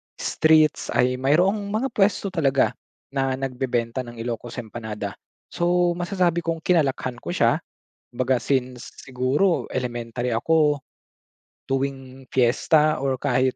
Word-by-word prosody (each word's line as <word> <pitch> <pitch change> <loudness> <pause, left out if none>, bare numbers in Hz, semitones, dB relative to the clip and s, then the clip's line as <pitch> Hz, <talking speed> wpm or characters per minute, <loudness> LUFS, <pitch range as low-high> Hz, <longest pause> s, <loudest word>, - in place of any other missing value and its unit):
streets 155 -1 +3
ay 125 +1 +2
mayroong 185 +10 +2
mga 220 +6 -1
puwesto 200 -2 +1
talaga 140 -6 +2 0.4
na 135 -1 0
nagbebenta 125 -2 -2
ng 120 - -9
Ilocos 120 0 -5
empanada. 110 -3 -6 0.3
So, 175 0 +2
masasabi 175 -1 +1
kong 165 -1 -3
kinalakihan 135 -7 +1
ko - - -5
siya - - +3 0.6
baga 130 0 +1
since, 125 -2 -2 0.2
siguro 130 +8 +1
elementary 120 -1 -3
ako 150 +5 +2 0.9
tuwing 135 -1 -3
fiesta 150 +5 +3
or 135 -2 0
kahit 130 -1 +1
135 Hz, 115 wpm, -23 LUFS, 125-160 Hz, 0.9 s, streets